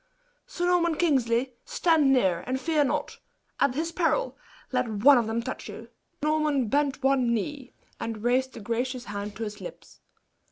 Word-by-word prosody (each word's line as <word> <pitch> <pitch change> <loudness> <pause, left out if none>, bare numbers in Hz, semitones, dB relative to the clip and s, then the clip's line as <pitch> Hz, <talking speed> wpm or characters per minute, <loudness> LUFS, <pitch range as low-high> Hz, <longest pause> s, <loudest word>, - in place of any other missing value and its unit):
Sir 355 -8 -3
Norman 345 -2 +2
Kingsley, 255 -6 +1
stand 320 -5 +3
near, 190 -10 +2
and 260 +1 -1
fear 310 +1 +2
not. 270 - -2 0.4
At 255 - +2
his 325 +3 -1
peril, 355 +9 0 0.4
let 250 -1 0
one 245 +6 +6
of 230 - -1
them 230 +1 -1
touch 260 - -6
you!" - - -9 0.3
Sir - - +1
Norman 300 -6 +1
bent 285 +1 +1
on - - -24
one 265 -3 +2
knee, 265 +4 -5 0.3
and 225 -2 -5
raised 260 +2 +1
the - - -9
gracious 245 +3 -2
hand 205 0 -5
to 225 - -5
his 210 -1 -6
lips. 180 - -11
260 Hz, 175 wpm, -27 LUFS, 230-300 Hz, 0.4 s, one